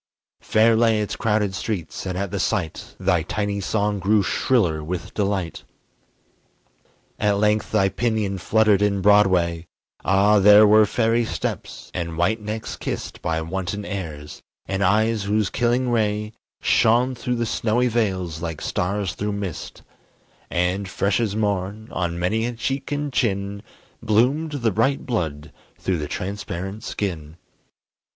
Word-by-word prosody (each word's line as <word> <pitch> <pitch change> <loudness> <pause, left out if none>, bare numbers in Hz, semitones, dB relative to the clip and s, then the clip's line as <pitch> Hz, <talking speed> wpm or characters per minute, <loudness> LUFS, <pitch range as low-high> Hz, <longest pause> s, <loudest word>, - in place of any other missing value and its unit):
Fair 110 +1 +3
lay 115 -1 +3
its 105 - -2
crowded 105 -3 0
streets, 95 -2 -4
and 90 -1 -3
at 100 0 -3
the 100 - -2
sight 95 -5 -2
Thy 90 -3 +2
tiny 100 +4 -2
song 105 +1 0
grew 100 +2 +3
shriller 90 -8 +1
with 90 +3 -5
delight. 100 -4 -2 1.6
At 105 -1 +2
length 105 +1 +1
thy 100 -3 +3
pinion 105 -2 -1
fluttered 105 +1 +3
in 100 -1 +1
Broadway, 90 -5 +3 0.4
Ah, 100 +2 +4
there 105 +2 +8
were 105 0 +6
fairy 115 +1 +2
steps, 110 - -5
and 85 -2 -4
white 105 +6 +1
necks 110 +1 -5
kissed - - -5
By 80 0 -1
wanton 95 +4 -4
airs, 80 -7 -6 0.2
and 95 0 -1
eyes 110 +2 +2
whose 105 -1 +1
killing 125 +1 +1
ray 105 -1 0 0.3
Shone 120 +3 +3
through 125 0 -2
the 120 0 -1
snowy 115 +2 +1
veils 95 -8 -1
like 80 -3 -4
stars 95 0 -2
through 105 +2 -3
mist; 100 -5 -6 0.7
And 90 +3 0
fresh 100 +2 0
as 110 -4 -1
morn, 105 0 -2
on 85 -1 -2
many 110 +7 0
a 120 - -3
cheek 135 +4 -3
and 145 -1 -2
chin, 100 -3 -1 0.4
Bloomed 130 +9 +2
the 120 -6 0
bright 125 +7 +1
blood 80 - -3 0.3
through 90 -3 -1
the 75 - -3
transparent 95 +2 -5
skin. 85 -6 -4
105 Hz, 145 wpm, -23 LUFS, 95-110 Hz, 1.6 s, there